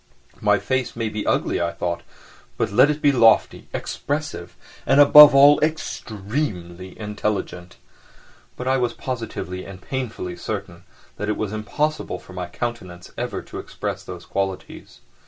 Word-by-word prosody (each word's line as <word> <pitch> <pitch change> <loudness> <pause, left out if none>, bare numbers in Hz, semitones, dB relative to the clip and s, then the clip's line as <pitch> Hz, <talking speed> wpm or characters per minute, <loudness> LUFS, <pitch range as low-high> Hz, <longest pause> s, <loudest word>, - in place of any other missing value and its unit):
"My - - +3
face 130 -1 -2
may 115 -2 -2
be 105 0 -5
ugly," - - +1
I 85 - 0
thought, 85 -1 -3 0.6
"but - - -1
let 125 +7 +5
it 150 0 -2
be 145 - +6
lofty, 115 -4 +3
expressive, 145 - -4 0.3
and, 135 +2 +3
above 145 0 +10
all, 145 +1 +7
extremely 105 - -3
intelligent." 105 -4 -4 0.8
But 125 - -5
I 135 0 +3
was 125 -2 0
positively 115 -7 -5
and 100 -2 -10
painfully 115 -7 -5
certain - - -6 0.3
that 105 +1 -3
it 105 - -1
was 110 -1 -3
impossible 150 +8 -2
for 95 - -14
my 90 -1 -5
countenance 90 -4 -6
ever - - -4
to - - -8
express - - -5
those - - -9
qualities. 95 -1 -5
110 Hz, 145 wpm, -22 LUFS, 95-135 Hz, 0.8 s, above